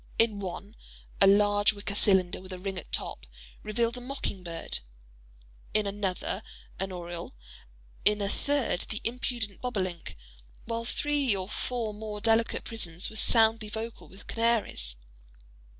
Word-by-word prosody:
In 220 -3 +3
one, 200 +2 -5 0.5
a 195 - +9
large 205 +1 +6
wicker 200 0 -5
cylinder 190 -3 +3
with 190 0 -10
a 185 - -4
ring 190 0 -3
at - - -12
top, - - -1 0.3
revelled 230 +3 +1
a - - -6
mocking 250 -7 -3
bird; 170 -2 -3 1.0
in 215 -1 +4
another 200 0 -1 0.4
an 195 0 -1
oriole; 175 - -6 0.7
in 210 0 +4
a 200 - 0
third 275 -4 +1
the 215 - -2
impudent 235 -3 -2
bobolink—while 175 - -4
three 285 -2 +2
or 185 -1 -2
four 225 0 -2
more 210 0 -5
delicate 225 +1 +3
prisons 180 -6 -2
were 220 +2 +3
loudly 220 -1 +4
vocal 225 +2 -5
with 195 - -13
canaries. 225 - +1
205 Hz, 135 wpm, -30 LUFS, 185-230 Hz, 1.0 s, a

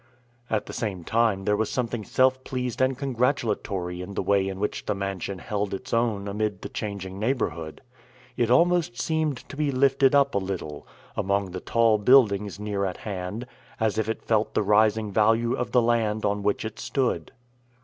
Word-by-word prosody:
At 110 -2 0
the - - -8
same 95 -6 -3
time 110 -1 +1
there 105 - +3
was 110 +1 0
something 120 -3 -2
self 130 +4 +2
pleased 125 -2 -3
and 130 0 +2
congratulatory 115 -9 -1
in 100 +2 -7
the - - -1
way 100 0 +2
in 95 0 -5
which 105 - -3
the - - 0
mansion 100 -1 -4
held 100 +1 -2
its 130 +7 -8
own 115 -4 +1
amid 105 -1 -2
the - - -5
changing 100 -2 -5
neighborhood. 105 - -2 0.5
It 120 -2 +1
almost 170 -1 +3
seemed 155 -2 -1
to - - -9
be 150 0 0
lifted 135 +1 +3
up 140 -1 +4
a 100 - +2
little, 90 -6 -5 0.3
among 100 -1 0
the 90 - -5
tall 115 -2 +3
buildings 105 -4 +4
near 105 -1 -2
at 95 -2 -2
hand, 100 +3 -5 0.3
as 110 -2 +1
if 110 - -1
it 110 - -3
felt 110 -1 0
the - - +2
rising 105 +1 +3
value 115 +3 +3
of 125 - -2
the 125 -2 +4
land 110 -2 +1
on 105 0 0
which 105 +1 0
it 110 - -6
stood. 120 - -1
110 Hz, 185 wpm, -26 LUFS, 100-125 Hz, 0.5 s, up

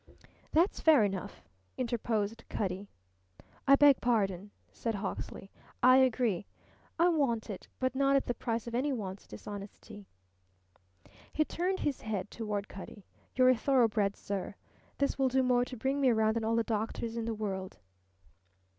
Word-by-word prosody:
"That's 340 +5 +2
fair 305 -8 +6
enough," 195 -2 -3 0.3
interposed 230 -3 -1
Cutty. 195 0 -3 0.8
"I 275 - +8
beg 285 -1 +6
pardon," 205 -5 0 0.2
said 230 -2 -3
Hawksley. 195 -1 -5 0.3
"I 255 +1 +8
agree. 240 -7 +2 0.5
I 340 +1 +4
want 245 -9 0
it, 190 - -8
but 255 -1 0
not 275 +1 +3
at 275 - +2
the 245 - -1
price 230 -2 -3
of 235 - -7
any 265 +5 0
one's 200 -6 -5
dishonesty." 205 - -9 1.2
He 310 - +1
turned 370 +4 -2
his 285 -3 -1
head 205 -3 -4
toward 210 -3 -3
Cutty, 195 +1 -10 0.3
"You're 255 0 +5
a 255 - +6
thoroughbred, 225 -6 +2
sir. 195 0 -5 0.4
This 280 0 0
will 270 - +4
do 260 +1 +2
more 245 -1 +3
to 250 - -8
bring 270 +5 -1
me 265 - +5
round 220 -1 +2
than 230 - -1
all 225 +1 +1
the 230 - +2
doctors 225 +1 -3
in 230 -1 -2
the 230 -1 -2
world." 190 - -4
230 Hz, 155 wpm, -31 LUFS, 205-260 Hz, 1.2 s, I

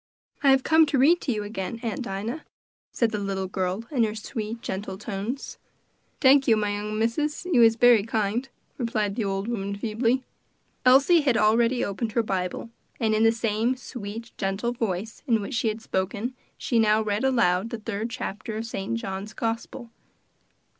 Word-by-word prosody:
"I 280 - +4
have 270 -1 +5
come 320 0 +5
to 280 - +1
read 315 +7 +5
to 265 - -1
you 210 -3 -2
again, 205 +1 -5
Aunt 230 +1 -2
Dinah," 225 +6 -4 0.5
said 235 -2 +1
the 210 - -2
little 195 -1 -2
girl, 185 +2 -2
in 255 -6 +2
her 215 -1 -1
sweet, 220 +1 -5
gentle 190 0 -4
tones. 210 +5 -5 0.6
"Tank 270 0 +5
you, 225 -3 +5
my 210 -1 0
young 210 +1 -3
missus; 295 +9 -1
you 335 -10 +3
is 225 -1 +6
bery 240 -2 +6
kind," 225 +4 -1 0.3
replied 215 -4 -1
the 225 - -1
old 195 +1 -2
woman 200 -4 -3
feebly. 230 +4 0 0.6
Elsie 280 +6 +6
had 260 -6 +2
already 230 +3 +3
opened 215 +2 -3
her 235 - +3
little - - -8
Bible, 180 +5 -3 0.3
and 220 -2 +1
in 215 +1 +3
the 225 - +6
same 225 +2 0
sweet, 230 -2 -8
gentle 195 +4 -1
voice 220 -3 -3
in 230 -3 +3
which 210 +7 -5
she 225 -1 0
had 220 +1 -2
spoken, 205 +6 -2 0.2
she 235 - 0
now 215 0 +4
read 210 +2 -1
aloud 230 -6 +2
the 235 - -4
third 220 0 -4
chapter 225 -2 -5
of 225 - -3
St. 225 0 -3
John's 200 -1 -5
gospel. 230 +1 -4
225 Hz, 180 wpm, -25 LUFS, 205-240 Hz, 0.6 s, is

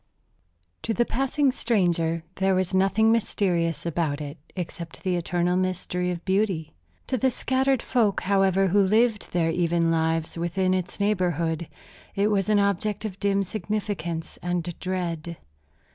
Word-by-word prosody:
To 225 - -2
the 240 - +2
passing 270 +3 +1
stranger 170 -9 +1
there 190 0 +2
was 185 0 0
nothing 195 +4 +3
mysterious 175 -8 0
about 160 -3 -1
it 145 +1 -7 0.2
except 170 -2 -6
the 185 -1 +1
eternal 175 +1 0
mystery 180 -1 -1
of 175 -1 -4
beauty. 190 -5 0 0.3
To 260 - -1
the 260 - +3
scattered 265 +1 +1
folk, 220 -6 +1
however, 195 0 +3
who 200 +3 +4
lived 215 +2 +2
their 165 -2 +1
even 170 -1 +1
lives 165 0 0
within 185 +2 +1
its 185 0 -3
neighborhood, 170 -5 0 0.5
it 200 +2 +2
was 200 0 +1
an 210 - +4
object 200 +1 0
of 195 -3 -5
dim 200 0 +2
significance 190 -4 -4
and 175 -1 -1 0.2
dread. 170 -3 -3
185 Hz, 145 wpm, -25 LUFS, 170-205 Hz, 0.5 s, who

